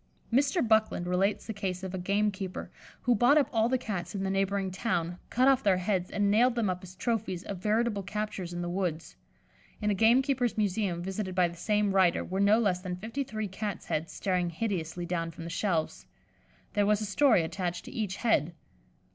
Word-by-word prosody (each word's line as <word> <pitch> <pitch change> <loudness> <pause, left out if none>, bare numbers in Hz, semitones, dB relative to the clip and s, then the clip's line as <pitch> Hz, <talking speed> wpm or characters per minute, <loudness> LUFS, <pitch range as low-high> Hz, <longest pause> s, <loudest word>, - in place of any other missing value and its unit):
Mr. 280 +2 +2
Buckland 220 -5 +2
relates 185 +3 0
the 220 - -4
case 190 -2 -4
of 190 -1 -5
a 190 - -3
gamekeeper 200 0 -1 0.3
who 245 - +4
bought 245 +6 +5
up 290 - +4
all 225 0 +3
the 260 - +2
Cats 195 -7 -4
in 195 - -2
the 190 - -1
neighbouring 195 0 0
town, 180 -3 -2
cut 255 +2 +3
off 270 -1 +5
their 195 -5 +3
heads, 185 -1 -1
and 200 -1 +1
nailed 240 +4 +4
them 220 -5 +1
up 180 - -4
as 185 -1 -11
trophies 195 -3 -2
of 195 -3 -6
veritable 215 +1 +1
captures 195 -2 -4
in 175 0 -4
the - - -3
woods. 175 -3 -3 0.6
In 210 -1 +1
a - - +3
gamekeeper's 245 +3 +3
museum, 195 -4 0
visited 190 0 -4
by 180 -1 +4
the 170 - -9
same 210 +3 +1
writer, 185 -3 +3
were 190 +1 -3
no 200 +2 +5
less 200 -6 +1
than 180 -1 -4
fifty 225 +9 -4
three 215 -4 -4
Cats' 200 +1 -5
heads 160 +2 -2
staring 180 -2 -1
hideously 175 -2 -3
down 170 -1 -2
from 165 0 -9
the 170 - -6
shelves. 170 -3 -1 0.7
There 205 -2 +2
was 210 0 +3
a - - -1
story 210 - +4
attached 175 +1 -3
to - - -9
each 210 -5 -2
head. 175 - +1
195 Hz, 205 wpm, -29 LUFS, 180-220 Hz, 0.7 s, bought